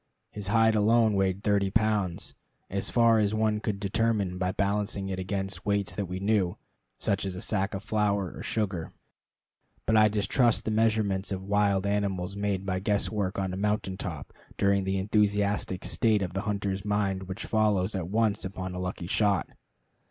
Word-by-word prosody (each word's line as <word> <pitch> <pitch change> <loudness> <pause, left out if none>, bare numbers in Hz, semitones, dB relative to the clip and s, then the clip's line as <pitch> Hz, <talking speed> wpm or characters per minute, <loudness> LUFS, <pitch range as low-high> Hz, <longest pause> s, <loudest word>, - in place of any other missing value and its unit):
His 105 -2 -6
hide 110 +2 +4
alone 110 +1 +4
weighed 95 0 0
thirty 100 -2 +2
pounds, 105 -4 0 0.4
as 100 +1 -1
far 115 -2 +4
as 105 0 +1
one 110 -1 +1
could 105 -2 -3
determine 100 -2 0
by 90 0 0
balancing 100 0 -1
it 95 -1 -3
against 95 +1 -3
weights 100 -1 0
that 100 -3 -3
we 90 +1 -4
knew, 100 -3 +1 0.4
such 100 0 0
as 95 -2 -3
a - - -5
sack 100 -2 -1
of 95 - -5
flour 105 -4 0
or - - -8
sugar. 95 -7 -2 0.9
But 110 - +2
I 110 0 +7
distrust 105 +3 +2
the 110 - 0
measurements 105 -3 +1
of 95 -1 -3
wild 100 -1 +2
animals 100 -2 -1
made 100 -2 -1
by 95 -1 -1
guesswork 100 -1 0
on 95 -1 -1
a - - -4
mountain 105 -1 -1
top 85 -7 -6 0.2
during 100 -1 +2
the 95 0 0
enthusiastic 100 -1 +1
state 110 -4 +2
of 90 -1 -4
the 95 - -1
hunter's 100 -2 -2
mind 100 -2 -1
which 95 +4 -5
follows 105 -3 +1
at 95 -4 -3
once 110 0 +1
upon 95 -1 -5
a 90 - -5
lucky 90 -1 -4
shot. 100 -1 +1
100 Hz, 175 wpm, -28 LUFS, 95-105 Hz, 0.9 s, I